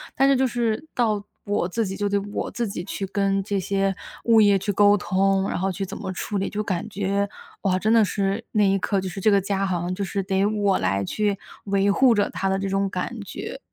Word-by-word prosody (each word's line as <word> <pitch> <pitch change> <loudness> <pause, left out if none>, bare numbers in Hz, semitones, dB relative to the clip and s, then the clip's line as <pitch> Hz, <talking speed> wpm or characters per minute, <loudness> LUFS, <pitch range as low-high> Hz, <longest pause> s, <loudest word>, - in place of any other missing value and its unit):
但 270 - +4
是 275 - +5
就 265 +1 +2
是 235 +2 -1
到 215 -4 +1 0.2
我 205 -4 0
自 225 +4 -1
己 190 0 -4
就 205 +1 -1
得 200 0 +2
我 - - -3
自 235 -1 -2
己 195 -3 -5
去 195 +1 -4
跟 195 0 0
这 200 0 -2
些 195 +1 0 0.3
物 225 -2 +6
业 205 -1 +5
去 205 - -1
沟 205 +1 +5
通， 195 0 +1
然 - - -2
后 190 +1 0
去 195 +2 -3
怎 - - -7
么 - - -5
处 205 +2 -3
理， 195 - -1
就 210 - -2
感 190 0 -3
觉， 200 0 -1 0.3
哇 185 -2 +1
真 215 +3 +2
的 225 -1 +6
是， 200 +1 -1
那 210 - +3
一 195 0 +3
刻 200 +1 0
就 190 - -4
是 185 +2 -6
这 215 - +4
个 200 - +5
家 195 0 -1
好 180 -3 -1
像 175 +1 -2
就 200 - -3
是 195 +1 -2
得 190 0 +1
我 205 -2 +2
来 100 +1 0
去 205 - 0 0.3
维 200 0 +2
护 250 +4 +5
着 205 -1 +1
它 190 +2 -2
的 190 - +1
这 195 - -2
种 195 0 0
感 210 +5 -4
觉。 200 - -7
200 Hz, 265 characters per minute, -24 LUFS, 190-210 Hz, 0.3 s, 物